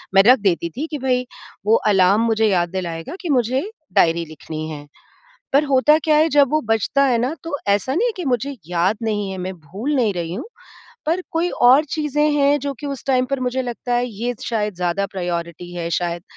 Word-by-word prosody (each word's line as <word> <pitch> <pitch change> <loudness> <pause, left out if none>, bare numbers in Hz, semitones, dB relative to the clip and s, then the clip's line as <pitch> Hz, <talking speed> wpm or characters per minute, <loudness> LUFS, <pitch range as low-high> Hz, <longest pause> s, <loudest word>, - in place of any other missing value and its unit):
मैं 195 - +8
रख 250 +3 +6
देती 175 -4 0
थी 310 +4 -2
कि 300 - -2
भई 250 -1 0 0.4
वो 220 +2 +5
अलार्म 195 +1 +4
मुझे 220 -1 +2
याद 175 -3 +1
दिलाएगा 170 - -5
कि 350 - -5
मुझे 260 - +1 0.2
डायरी 165 0 +3
लिखनी 155 0 -7
है। 145 -2 -8 0.7
पर 280 +2 +4
होता 280 +2 +4
क्या 305 -1 +4
है 315 +2 +4
जब 285 -3 +4
वो 310 0 +2
बजता 225 +5 +2
है 240 -3 +2
ना 255 +7 -1
तो 330 -3 -5
ऐसा 205 +6 +1
नहीं 435 +10 +2
है 465 - -2
कि 360 - -4
मुझे 265 +1 -1
याद 180 +4 +1
नहीं 210 -3 -1
है, 190 - -5
मैं 185 +1 -4
भूल 205 - -4
नहीं 225 -6 +2
रही 170 -1 -3
हूँ, 225 - -5 0.6
पर 345 +3 0
कोई 335 +2 0
और 260 +5 +7
चीज़ें 300 0 0
हैं 290 0 +3
जो 280 0 -3
कि 290 - -5
उस 275 -2 -5
टाइम 255 -1 +3
पर 275 - -1
मुझे 255 +1 -1
लगता 245 0 -3
है 245 +1 +1
ये 240 +2 -4
शायद 210 -4 -1
ज़्यादा 180 +3 -1
प्रायोरिटी 175 -2 -5
है, 170 -1 -3
शायद 170 0 -1
235 Hz, 215 wpm, -20 LUFS, 180-280 Hz, 0.7 s, मैं